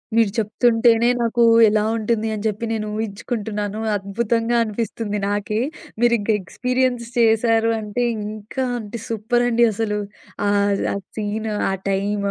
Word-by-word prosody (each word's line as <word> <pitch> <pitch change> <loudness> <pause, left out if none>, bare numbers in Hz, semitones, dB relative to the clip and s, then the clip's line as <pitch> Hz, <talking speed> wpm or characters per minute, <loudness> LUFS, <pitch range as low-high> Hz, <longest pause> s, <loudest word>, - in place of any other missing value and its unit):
మీరు 225 -3 +4
చెప్తుంటేనే 230 +1 +3
నాకు 235 0 +2 0.3
ఎలా 215 0 +2 0.2
ఉంటుంది 225 0 0
అని 210 - -5
చెప్పి 215 +1 -1
నేను 220 -1 -2
ఊహించుకుంటున్నాను 210 -1 -3 0.2
అద్భుతంగా 230 +4 -1
అనిపిస్తుంది 215 -1 -3
నాకే. 205 +1 -1 0.4
మీరింకా 235 -3 +3
ఎక్స్‌పీరియెన్స్ 250 +5 -1
చేశారు 225 0 +3
అంటే, 215 +3 -2 0.2
ఇంకా 215 +5 -5
అంటే, 220 0 -6
సూపరండి 240 +1 +2
అసలు. 210 -1 -1 0.5
ఆహ్, 200 0 +2
ఆ - - -3 0.2
సీన్ 215 +1 -2 0.2
ఆ - - 0 0.2
టైం, 200 +2 0
220 Hz, 120 wpm, -21 LUFS, 210-235 Hz, 0.5 s, మీరు